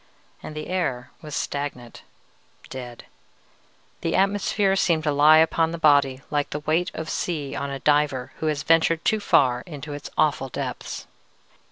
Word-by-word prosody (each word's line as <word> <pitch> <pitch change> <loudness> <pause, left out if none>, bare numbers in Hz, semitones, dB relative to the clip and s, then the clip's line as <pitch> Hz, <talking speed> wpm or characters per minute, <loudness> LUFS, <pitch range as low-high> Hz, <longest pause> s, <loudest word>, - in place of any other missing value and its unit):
"And 155 - -8
the 155 - -5
air 135 -10 -2
was 150 -2 -7
stagnant, 140 -5 -4 0.7
dead. 125 -2 -8 1.0
The 165 - -1
atmosphere 195 0 +2
seemed 165 -4 +1
to 150 - +1
lie 150 +2 +6
upon 160 0 +3
the 170 - -5
body 140 -4 +3
like 145 -1 0
the 150 - -4
weight 160 +4 0
of 160 - -5
sea 150 -6 -3
on 140 - -3
a 140 - -4
diver 140 -2 +1
who 160 - -2
has 150 -1 -1
ventured 165 0 +3
too 220 - +2
far 125 -11 +3
into 150 -2 -7
its 145 0 -7
awful 140 -3 +1
depths. - - -5
150 Hz, 160 wpm, -24 LUFS, 140-165 Hz, 1.0 s, lie